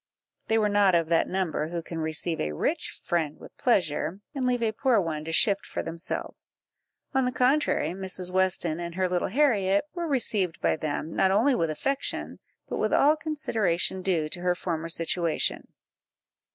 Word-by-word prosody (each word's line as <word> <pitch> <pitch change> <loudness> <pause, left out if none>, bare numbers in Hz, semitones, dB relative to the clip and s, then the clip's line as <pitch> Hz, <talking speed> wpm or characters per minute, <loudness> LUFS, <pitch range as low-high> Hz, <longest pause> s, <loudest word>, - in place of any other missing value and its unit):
They 225 - +2
were 215 -1 +2
not 205 -3 +3
of 165 -1 +1
that 165 -1 +2
number 180 -5 -1
who 170 0 -4
can 165 0 -6
receive 160 +1 0
a 75 0 -2
rich - - -2
friend 160 -4 -1
with - - -14
pleasure, 180 - 0
and 265 -3 -1
leave 245 -1 0
a 220 - +1
poor 235 +1 +2
one 160 -4 -3
to 165 - -4
shift 200 +4 +3
for - - -5
themselves; 165 +1 -4 0.6
on 265 -1 +2
the 250 - 0
contrary, 255 - +2
Mrs. 185 0 -2
Weston 180 -3 +2
and 170 -1 -6
her 185 0 +1
little 180 -1 -1
Harriet 200 -6 +2
were 345 -2 -3
received 215 - +1
by - - +1
them, 155 0 -4
not 190 - +3
only 220 +9 +3
with 165 -9 0
affection, 275 - -3 0.3
but - - -4
with - - 0
all 295 +2 +5
consideration 225 - -1
due 175 -5 0
to 175 - -3
her 180 0 +1
former 165 -2 -3
situation. 165 0 +1
185 Hz, 180 wpm, -27 LUFS, 165-225 Hz, 0.6 s, all